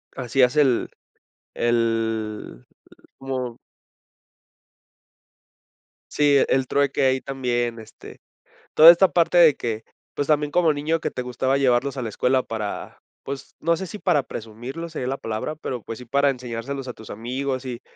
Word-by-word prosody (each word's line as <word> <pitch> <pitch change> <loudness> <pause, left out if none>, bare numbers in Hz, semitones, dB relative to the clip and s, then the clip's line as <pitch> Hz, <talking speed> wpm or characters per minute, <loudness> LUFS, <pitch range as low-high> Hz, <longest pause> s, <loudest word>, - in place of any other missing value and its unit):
hacías 125 +1 +2
el 135 -5 +3 0.7
el 115 - -1 0.5
como 130 -3 -4 2.5
sí, 145 -2 +4
el 130 0 +1
trueque 140 0 +1
ahí 130 0 +2
también, 120 -3 -2
este, 110 -1 -13 0.5
toda 160 +2 +10
esta 175 +3 +5
parte 170 0 +2
de 165 -5 +7
que, 110 -2 -4 0.3
pues, 145 - -2
también 150 -1 +1
como 165 0 +3
niño 150 +3 -1
que - - -3
te - - -5
gustaba 130 +2 -1
llevarlos 135 +1 +1
a - - -2
la 115 - -3
escuela 130 +5 +1
para, 110 -4 -5 0.3
pues, 140 0 -7
no 170 +1 +2
sé 190 - -5
si 210 - -8
para 175 -8 +2
presumirlo 120 +9 -7
sería 155 -6 -5
la 135 +2 -2
palabra, 110 +7 -4
pero, 130 -6 -5
pues, 115 - -7
sí 125 - -11
para 140 +3 +2
enseñárselos 125 +1 -5
a 125 - -5
tus 110 - -13
amigos 130 +4 -4
y 125 -1 -6
130 Hz, 150 wpm, -23 LUFS, 120-145 Hz, 2.5 s, toda